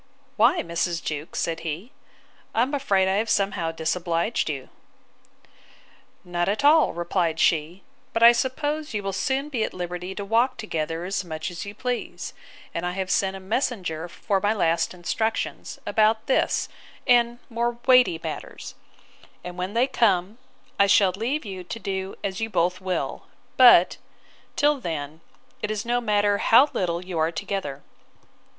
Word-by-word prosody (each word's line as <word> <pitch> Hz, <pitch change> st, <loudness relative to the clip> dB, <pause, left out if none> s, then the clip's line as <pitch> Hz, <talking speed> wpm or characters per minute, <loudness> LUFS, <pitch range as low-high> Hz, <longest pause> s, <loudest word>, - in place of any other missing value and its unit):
Why, 220 Hz, -, +4 dB
Mrs. 170 Hz, 0 st, -2 dB
Jewkes? 150 Hz, +1 st, -5 dB
said 165 Hz, -1 st, -1 dB
he: 170 Hz, -, -5 dB, 0.6 s
I 230 Hz, -, +4 dB
am 270 Hz, +4 st, -3 dB
afraid 200 Hz, -10 st, +2 dB
I 190 Hz, +1 st, +1 dB
have 220 Hz, +2 st, -1 dB
somehow 195 Hz, -5 st, 0 dB
disobliged 165 Hz, +5 st, -1 dB
you. 135 Hz, -3 st, -5 dB, 1.5 s
Not 175 Hz, 0 st, -1 dB
at 210 Hz, +7 st, -1 dB
all, 310 Hz, +1 st, +5 dB
replied 170 Hz, -1 st, -1 dB
she; 165 Hz, +3 st, +1 dB, 0.3 s
but 230 Hz, -, +1 dB
I 235 Hz, -, +11 dB
suppose 290 Hz, +3 st, -2 dB
you 205 Hz, -, -2 dB
will 195 Hz, 0 st, -3 dB
soon 270 Hz, +8 st, -1 dB
be 245 Hz, -6 st, -1 dB
at -, -, -4 dB
liberty 180 Hz, +1 st, -5 dB
to 200 Hz, -, -5 dB
walk 235 Hz, +5 st, +2 dB
together 165 Hz, -4 st, -3 dB
as 195 Hz, 0 st, -2 dB
much 160 Hz, -1 st, -5 dB
as 175 Hz, -, -6 dB
you 200 Hz, +1 st, -8 dB
please: 250 Hz, +1 st, -4 dB, 0.4 s
and 170 Hz, -, -3 dB
I 180 Hz, 0 st, -2 dB
have 190 Hz, 0 st, -3 dB
sent 195 Hz, -1 st, +1 dB
a -, -, -7 dB
messenger 190 Hz, -, -2 dB
for 195 Hz, +2 st, -1 dB
my 205 Hz, +1 st, +2 dB
last 170 Hz, -2 st, +1 dB
instructions, 220 Hz, +6 st, -2 dB
about 220 Hz, 0 st, +2 dB
this 265 Hz, -, +1 dB, 0.4 s
and 240 Hz, -2 st, +4 dB
more 235 Hz, 0 st, -1 dB
weighty 250 Hz, -10 st, +5 dB
matters; 160 Hz, -, -6 dB, 0.7 s
and 180 Hz, 0 st, -7 dB
when 185 Hz, +4 st, -4 dB
they 240 Hz, +2 st, +4 dB
come 215 Hz, -5 st, +1 dB, 0.4 s
I 200 Hz, -, +6 dB
shall 195 Hz, -1 st, +5 dB
leave 235 Hz, +9 st, -2 dB
you 190 Hz, -3 st, -6 dB
to 230 Hz, -, -5 dB
do 190 Hz, -3 st, -4 dB
as 195 Hz, +1 st, -3 dB
you 225 Hz, -, -1 dB
both 180 Hz, -2 st, 0 dB
will; 185 Hz, -1 st, -3 dB, 0.3 s
but, 240 Hz, -9 st, +7 dB, 0.6 s
till 295 Hz, -1 st, +3 dB
then, 155 Hz, -, -5 dB, 0.4 s
it 210 Hz, -, -2 dB
is 215 Hz, +1 st, -3 dB
no 240 Hz, +1 st, +1 dB
matter 205 Hz, -2 st, +2 dB
how 265 Hz, +6 st, +6 dB
little 175 Hz, -1 st, -1 dB
you 180 Hz, -3 st, -3 dB
are 160 Hz, +1 st, +2 dB
together. 155 Hz, -4 st, -4 dB
195 Hz, 160 wpm, -25 LUFS, 175-230 Hz, 1.5 s, I